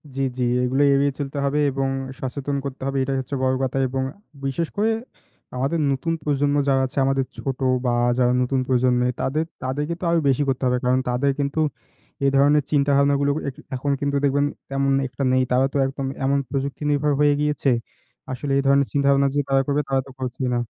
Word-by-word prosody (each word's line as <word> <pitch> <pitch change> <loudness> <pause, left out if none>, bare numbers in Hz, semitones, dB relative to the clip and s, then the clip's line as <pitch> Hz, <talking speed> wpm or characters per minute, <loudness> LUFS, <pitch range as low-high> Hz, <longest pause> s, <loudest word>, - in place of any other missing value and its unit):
জি, 135 - -2 0.2
জি 125 - 0 0.2
এগুলো 130 +3 +1
এড়িয়ে 140 +1 +2
চলতে 140 0 -4
হবে, 140 +2 +1
এবং 135 0 -1 0.3
সচেতন 140 +2 -3
করতে 135 -1 -6
হবে 135 0 -2
এটাই 135 0 -1
হচ্ছে 130 +2 -5
বড় 130 0 +2
কথা 130 0 -1
এবং 130 +1 -2 0.4
বিশেষ 150 +5 -1
করে 210 +2 +2 0.7
আমাদের 135 +6 0
নতুন 140 +5 -1
প্রজন্ম 145 0 +1
যারা 135 -1 +3
আছে, 130 - -15
আমাদের 135 -1 +1
ছোট 135 -2 -4 0.3
বা 125 - +2 0.3
যারা 125 -1 +3
নতুন 130 +1 0
প্রজন্মের 125 -1 +2
তাদের 155 +4 0 0.2
তাদেরকে 145 +5 -2
তো - - -10
আরও 170 - +3
বেশি 135 +2 +2
করতে 135 0 -1
হবে। 125 0 +2
কারণ 125 +1 +3
তাদের 130 +3 +1
কিন্তু 140 +2 -1 0.6
এই 140 - +4
ধরনের 145 +2 +4
চিন্তাভাবনা 140 -1 +3
গুলো 145 0 +2 0.2
এক 130 - -11 0.2
এখন 140 +3 -1
কিন্তু 140 0 0
দেখবেন 145 0 +2 0.2
তেমন 135 0 0 0.2
একটা 140 - -5
নেই। 130 0 +3
তারা 125 +1 +4
তো - - 0
একদম 135 0 -4 0.2
এমন 140 +1 +2
প্রযুক্তিনির্ভর 145 +1 -1
হয়ে 145 0 +5
গিয়েছে। 150 -1 +1 0.6
আসলে 135 +2 -4
এই - - +3
ধরনের 140 0 +4
চিন্তাভাবনা 140 -1 +3
যে - - +2
তারা 135 0 +4
করবে 145 +1 +1
তারা 135 -1 +2
তো - - -11
করছে 130 +1 -4
না। 120 - +1
140 Hz, 195 wpm, -23 LUFS, 130-145 Hz, 0.7 s, হয়ে